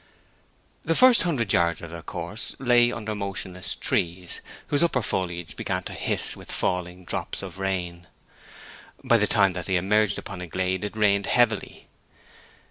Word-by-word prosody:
The 165 Hz, -, +1 dB
first 255 Hz, +2 st, +7 dB
hundred 135 Hz, -, 0 dB
yards 85 Hz, -1 st, +2 dB
of 85 Hz, -, -8 dB
their 85 Hz, 0 st, -7 dB
course 85 Hz, +6 st, -5 dB
lay 120 Hz, -2 st, +4 dB
under 110 Hz, -2 st, -4 dB
motionless 95 Hz, -1 st, -3 dB
trees, 90 Hz, +1 st, -1 dB, 0.3 s
whose 145 Hz, -, +2 dB
upper 150 Hz, -8 st, +2 dB
foliage 85 Hz, -4 st, -3 dB
began -, -, -2 dB
to -, -, -7 dB
hiss -, -, +1 dB
with -, -, -9 dB
falling 90 Hz, 0 st, -2 dB
drops -, -, -4 dB
of -, -, -8 dB
rain. 90 Hz, -2 st, -3 dB, 1.0 s
By 125 Hz, -3 st, +5 dB
the 105 Hz, -1 st, +2 dB
time 100 Hz, -3 st, +3 dB
that 90 Hz, -2 st, -3 dB
they 95 Hz, -, +1 dB
emerged 100 Hz, +3 st, +2 dB
upon 95 Hz, -3 st, -7 dB
a 90 Hz, -, -6 dB
glade 95 Hz, +2 st, -1 dB
it 105 Hz, +1 st, -5 dB
rained 100 Hz, -2 st, +2 dB
heavily. 115 Hz, -4 st, +1 dB
95 Hz, 160 wpm, -25 LUFS, 90-110 Hz, 1.0 s, first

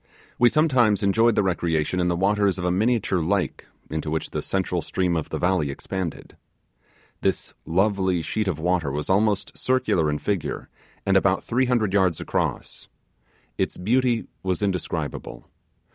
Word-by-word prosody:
We 120 Hz, -, +6 dB
sometimes 125 Hz, -10 st, +3 dB
enjoyed 115 Hz, +3 st, +3 dB
the 105 Hz, -, +3 dB
recreation 85 Hz, -2 st, 0 dB
in 90 Hz, -, +2 dB
the 85 Hz, -, +1 dB
waters 100 Hz, +1 st, +2 dB
of 90 Hz, -, -3 dB
a 90 Hz, -, +2 dB
miniature 105 Hz, -1 st, +1 dB
lake, 85 Hz, -1 st, -1 dB, 0.2 s
to 80 Hz, 0 st, -3 dB
which 80 Hz, +1 st, -2 dB
the -, -, -2 dB
central 90 Hz, -2 st, -1 dB
stream 90 Hz, +1 st, -1 dB
of 80 Hz, -, -2 dB
the -, -, -3 dB
valley 90 Hz, -5 st, +1 dB
expanded. 90 Hz, +4 st, -5 dB, 0.9 s
This -, -, -1 dB
lovely 95 Hz, -1 st, +1 dB
sheet 110 Hz, +6 st, -2 dB
of 90 Hz, -6 st, -1 dB
water 85 Hz, -3 st, 0 dB
was 75 Hz, +5 st, -2 dB
almost 100 Hz, +1 st, +1 dB
circular 105 Hz, -11 st, +1 dB
in 75 Hz, -, 0 dB
figure, 100 Hz, 0 st, -3 dB, 0.4 s
and -, -, +2 dB
about -, -, +3 dB
three 130 Hz, +3 st, +1 dB
hundred 115 Hz, -6 st, +1 dB
yards 95 Hz, -5 st, +2 dB
across. -, -, -3 dB, 0.7 s
Its -, -, -1 dB
beauty 120 Hz, +4 st, +1 dB, 0.2 s
was 95 Hz, +1 st, -1 dB
indescribable. 95 Hz, -3 st, -3 dB
95 Hz, 155 wpm, -24 LUFS, 85-105 Hz, 0.9 s, We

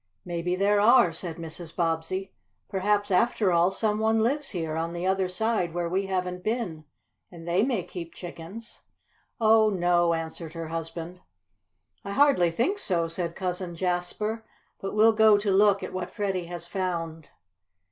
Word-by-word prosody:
"Maybe 175 Hz, 0 st, -2 dB
there 200 Hz, +2 st, +3 dB
are," 235 Hz, -4 st, +6 dB
said 165 Hz, 0 st, -4 dB
Mrs. 165 Hz, 0 st, -7 dB
Bobbsey. 165 Hz, +3 st, -1 dB, 0.3 s
"Perhaps, 205 Hz, +1 st, 0 dB
after 195 Hz, +1 st, +3 dB
all, 170 Hz, +1 st, +4 dB
some 210 Hz, +2 st, -1 dB
one 220 Hz, 0 st, +2 dB
lives 275 Hz, +4 st, 0 dB
here, 160 Hz, -4 st, -3 dB
on 165 Hz, +1 st, -2 dB
the 175 Hz, +1 st, -3 dB
other 190 Hz, 0 st, +1 dB
side 180 Hz, -2 st, -1 dB
where 175 Hz, -1 st, -1 dB
we 190 Hz, +3 st, -1 dB
haven't 180 Hz, -1 st, -2 dB
been. 215 Hz, -9 st, -3 dB, 0.4 s
And 170 Hz, -1 st, -12 dB
they 175 Hz, +3 st, +2 dB
may 235 Hz, -5 st, 0 dB
keep 170 Hz, -2 st, -8 dB
chickens." 180 Hz, +6 st, -9 dB, 0.6 s
"Oh, 220 Hz, -1 st, +5 dB
no," 175 Hz, -3 st, +2 dB
answered 165 Hz, 0 st, -6 dB
her 165 Hz, -2 st, -6 dB
husband. 165 Hz, +2 st, -6 dB, 0.8 s
"I 200 Hz, -, -5 dB
hardly 275 Hz, -10 st, +4 dB
think 255 Hz, -, 0 dB
so," 170 Hz, -, 0 dB
said 170 Hz, 0 st, -4 dB
Cousin 180 Hz, -1 st, -3 dB
Jasper. 185 Hz, +5 st, -2 dB, 0.4 s
"But 195 Hz, -, -5 dB
we'll 220 Hz, +1 st, +6 dB
go 220 Hz, -1 st, +6 dB
to 205 Hz, -1 st, 0 dB
look 200 Hz, 0 st, +4 dB
at -, -, -6 dB
what 185 Hz, -1 st, -4 dB
Freddie 195 Hz, -4 st, -2 dB
has 170 Hz, -1 st, -5 dB
found." 170 Hz, -3 st, -4 dB
180 Hz, 160 wpm, -27 LUFS, 170-210 Hz, 0.8 s, are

